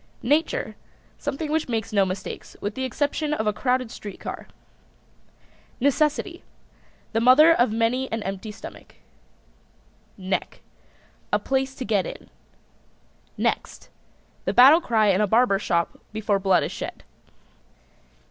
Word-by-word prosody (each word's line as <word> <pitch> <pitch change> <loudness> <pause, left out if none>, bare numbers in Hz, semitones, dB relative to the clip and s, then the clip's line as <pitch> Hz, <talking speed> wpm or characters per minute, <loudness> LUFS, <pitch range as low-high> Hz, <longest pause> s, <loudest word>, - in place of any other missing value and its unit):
NATURE. 315 - 0 0.4
Something 290 +2 -3
which 315 -3 0
makes 225 -2 -2
no 200 -2 +3
mistakes, 185 0 -6
with 205 +1 -3
the 260 +3 -3
exception 290 +4 -1
of 220 - -2
a 210 - +1
crowded 250 +1 0
street 205 -2 -9
car. - - -7 1.3
NECESSITY. 300 +6 +1 0.7
The 225 - +1
mother 285 +7 +7
of 240 -7 +2
many 230 +4 0
an 225 -1 -2
empty 195 +3 -5
stomach. 210 - -12 1.2
NECK. 190 -1 -3 0.7
A - - +4
place 265 0 -1
to 255 - -5
get 205 -5 +1
it - - -6
in. - - -21 1.1
NEXT. - - -2 0.6
The - - 0
battle 280 +7 +8
cry 220 -8 +2
in 195 +1 +3
a 210 - +2
barber 220 -2 +3
shop 170 -4 -1
before 210 -2 0
blood 190 -1 +3
is - - -3
shed. - - -7
235 Hz, 135 wpm, -24 LUFS, 205-275 Hz, 1.3 s, battle